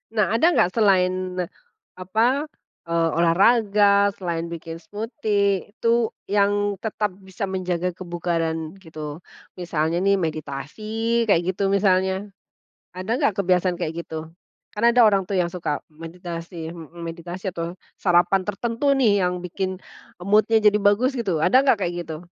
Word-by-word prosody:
Nah 210 - +4
ada - - +4
gak 175 - +3
selain 185 -4 +2 0.6
apa 230 +10 +1 0.4
eee, 165 0 +2
olahraga, 200 +3 +4
selain 170 -3 -3
bikin 165 -1 -7
smoothie, 205 -3 -1
itu 230 +1 +1 0.2
yang 205 0 +1
tetap 210 -3 -2
bisa 190 +1 -5
menjaga 180 -2 -2
kebugaran 170 -2 -3
gitu? 155 -1 -8 0.4
Misalnya 170 0 -1
nih 200 0 +3
meditasi 155 0 -5 0.4
kayak 175 -5 +3
gitu 200 - -4
misalnya. 190 -1 +3 0.8
Ada 185 +4 -5
gak - - +3
kebiasaan 180 -1 +2
kayak 155 - -3
gitu? 160 0 -7 0.4
Kan 210 - -4
ada 235 +1 +5
orang 195 -2 +3
tuh 200 - -5
yang 175 - +2
suka 170 -5 -3
meditasi 165 +1 -8
mhm, 170 0 -9 0.4
atau 170 -1 -5 0.2
sarapan 180 +1 +3
tertentu 230 +5 -3
nih 215 -8 +3
yang 180 - +1
bikin 185 +1 -3 0.4
mood-nya 210 +4 +3
jadi 210 -1 +5
bagus 235 +7 +3
gitu, 195 -9 -1
ada 255 - +4
nggak 265 -6 +3
kayak 175 -2 -1
gitu? 160 -1 -6
185 Hz, 135 wpm, -23 LUFS, 170-205 Hz, 0.8 s, ada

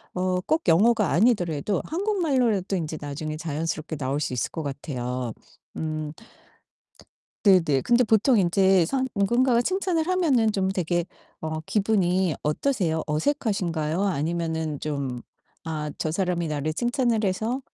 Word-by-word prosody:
어 185 0 0
꼭 315 - 0
영어가 210 +3 +4
아니더라도 180 - +2
한국말로라도 275 - 0
이제 155 -2 -4
나중에 155 +2 -5
자연스럽게 160 0 -3
나올 140 +1 -1
수 145 - -2
있을 125 - -1
것 160 - -4
같아요. 125 -4 -4 0.4
음. 155 -1 -3 1.3
네네. 170 -9 +4
근데 240 +1 +4
보통 225 +1 +3
인제 190 0 +4
선 260 +7 0
누군가가 235 +4 +3
칭찬을 365 -2 0
하면은 295 -12 +3
좀 190 -2 0
되게 175 -2 0 0.4
어 155 0 -3
기분이 190 -3 +1
어떠세요? 160 - 0
어색하신가요? 170 - -1
아니면은 160 -3 -1
좀 140 -5 -3 0.5
아 150 -1 -3
저 155 - -1
사람이 180 -2 0
나를 150 0 -2
칭찬을 240 -1 +1
해서 220 +7 -1
180 Hz, 300 characters per minute, -25 LUFS, 155-225 Hz, 1.3 s, 영어가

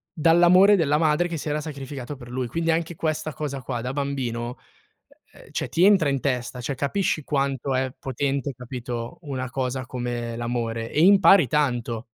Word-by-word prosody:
dall'amore 175 +5 +6
della 150 -4 +2
madre 160 +2 +2
che 170 -2 -4
si 150 - -6
era 150 +1 -1
sacrificata 140 -2 -7
per 120 -2 -12
lui. 125 0 -3
Quindi 165 +5 0
anche 165 +1 -1
questa 155 -1 -2
cosa 140 -1 -4
qua 120 -2 -4
da 125 +2 -4
bambino, 125 -4 -3 0.8
ehm, - - -17
cioè - - -3
ti 175 +3 +3
entra 190 -8 +5
in 140 -1 0
testa, 125 -2 -2
cioè 135 +3 -3
capisci 155 +1 -1
quanto 135 -2 -1
è 130 0 -1
potente 135 +1 -2
capito 125 +3 -6
una 130 -4 -4
cosa 130 0 -3
come 120 -1 -4
l'amore 115 -1 -3
e 150 - +1
impari 190 -5 +6
tanto. 120 -5 -1
135 Hz, 170 wpm, -24 LUFS, 125-155 Hz, 0.8 s, dall'amore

